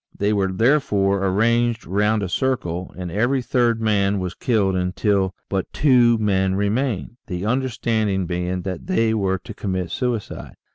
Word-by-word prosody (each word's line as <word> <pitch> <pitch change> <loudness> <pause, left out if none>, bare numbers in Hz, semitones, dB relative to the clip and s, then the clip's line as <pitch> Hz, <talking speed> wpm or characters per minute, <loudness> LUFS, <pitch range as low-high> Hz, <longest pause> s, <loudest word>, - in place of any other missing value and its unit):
They 105 +1 +1
were 95 -2 +1
therefore 100 -4 +2
arranged 115 +4 +1
round 105 +2 +1
a - - -1
circle, 90 -5 -2
and 90 -2 -5
every 125 +7 +1
third 120 -1 +1
man 100 -2 +1
was 90 -1 -3
killed 100 -5 +1
until 95 +1 0
but 95 -1 -3
two 125 -5 +4
men 95 -3 +1
remained, 110 +3 -1
the 90 +2 -4
understanding 110 -5 0
being 90 +1 -3
that 95 - -5
they 115 -12 +2
were 95 -3 0
to 110 +4 -10
commit 95 -3 -3
suicide. 120 -4 -3
105 Hz, 150 wpm, -22 LUFS, 95-115 Hz, -, two